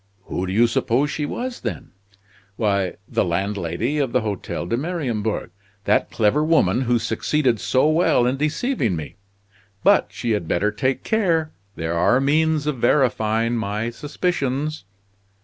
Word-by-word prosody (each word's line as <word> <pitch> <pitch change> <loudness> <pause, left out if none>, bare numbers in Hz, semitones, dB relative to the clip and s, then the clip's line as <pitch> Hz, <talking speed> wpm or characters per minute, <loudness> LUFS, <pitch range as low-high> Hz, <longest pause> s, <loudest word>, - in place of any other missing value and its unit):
"Who 95 -1 -3
do - - -3
you 115 +5 +4
suppose 130 +3 +1
she 150 -1 -2
was, 250 - -4
then?" 105 -10 -5 0.6
"Why, 100 -4 0
the - - +1
landlady 100 - -1
of 135 -5 -1
the 125 - +3
Hotel 100 -5 -4
de 100 - -1
Mariembourg 125 - -2 0.3
that - - +2
clever 120 +7 +2
woman 155 - +3
who 120 -1 +2
succeeded 125 +1 0
so 130 +3 +2
well 155 -6 +3
in 125 +2 +1
deceiving 150 - 0
me. 80 +5 -7 0.7
But - - +5
she 120 - -3
had 105 -7 -1
better 105 +6 +1
take 130 +5 -1
care! 170 -8 +1 0.2
There 80 0 -3
are 90 +9 +3
means 155 +2 +2
of 150 -4 -2
verifying 120 -3 +2
my 110 +1 -2
suspicions." 150 - -2
120 Hz, 150 wpm, -22 LUFS, 105-150 Hz, 0.7 s, But